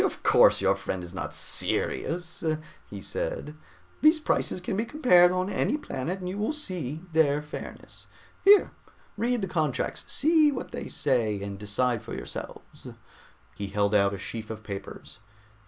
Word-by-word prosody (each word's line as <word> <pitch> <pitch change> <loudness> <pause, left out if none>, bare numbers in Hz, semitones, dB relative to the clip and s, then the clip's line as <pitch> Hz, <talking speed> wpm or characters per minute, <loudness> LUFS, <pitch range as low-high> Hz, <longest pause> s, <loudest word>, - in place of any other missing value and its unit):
"Of - - -2
course - - +6
your 95 0 +4
friend 95 -2 -4
is 90 0 -9
not 95 - -5
serious," 175 +1 -2 0.5
he 100 -1 -7
said. 150 - -4 0.5
"These 310 +1 +6
prices 305 - 0
can 185 +1 -3
be 215 - +1
compared 230 - +5
on 185 0 0
any 230 +8 0
planet 175 - -4
and 185 -1 -6
you 190 +3 -4
will 215 +9 0
see 175 - -4
their 150 -2 +4
fairness. 150 - -9 0.4
Here, 405 +1 +7 0.4
read 235 +1 0
the - - 0
contracts, 155 -7 -1
see 310 0 +4
what 260 - -5
they - - -5
say 115 -8 +1
and 100 -1 -6
decide 115 +3 0
for - - -7
yourselves." - - -8 0.7
He 100 - -4
held 100 +1 0
out 100 -1 +3
a - - -6
sheaf 110 +3 -6
of 110 -1 -7
papers. 100 -2 -8
155 Hz, 160 wpm, -27 LUFS, -, 0.7 s, Here